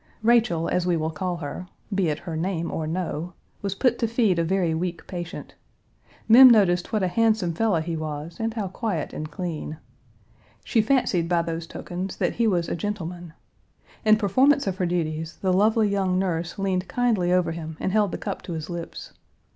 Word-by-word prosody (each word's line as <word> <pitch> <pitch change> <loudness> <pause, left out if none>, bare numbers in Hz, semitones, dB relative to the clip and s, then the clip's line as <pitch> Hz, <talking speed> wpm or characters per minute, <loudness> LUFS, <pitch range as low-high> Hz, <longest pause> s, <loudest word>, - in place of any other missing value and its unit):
Rachel, 225 -8 +3
as 180 0 0
we 175 -2 +2
will 160 0 -1
call 180 0 -3
her 165 +3 -6 0.3
(be 195 -3 +1
it 150 - -1
her 170 -3 -6
name 170 0 -2
or 160 -1 -3
no), 170 0 -3 0.3
was 200 -1 -2
put 245 +2 +1
to 230 - +1
feed 220 -6 +2
a - - +2
very 175 -1 +1
weak 170 +1 -3
patient. 175 -3 -7 0.7
Mem 255 +3 +10
noticed 185 -6 +3
what 215 -4 +1
a - - +2
handsome 215 -2 +2
fellow 200 0 +1
he 165 +1 -3
was 155 +1 -5
and 225 0 -2
how 210 -4 -2
quiet 190 - -3
and 155 0 -5
clean. 160 -2 -5 0.9
She 225 - +2
fancied 210 -8 +1
by 170 -1 +2
those 165 0 -4
tokens 180 +3 -6
that - - 0
he 230 -1 +3
was 175 -5 +1
a - - -2
gentleman. 175 -4 -5 0.7
In 215 -1 +6
performance 260 +8 +3
of 190 -2 -2
her 185 -3 0
duties, 165 -1 -2
the 185 -1 +2
lovely 215 +3 +3
young 190 -2 +1
nurse 175 -3 -2
leaned 190 -2 -1
kindly 225 -8 +1
over 180 -2 +2
him 160 -1 -6
and 190 - -1
held 210 -2 +2
the - - -3
cup - - -5
to 175 - -6
his 160 +1 -5
lips. 170 -1 -7
180 Hz, 195 wpm, -25 LUFS, 165-210 Hz, 0.9 s, Mem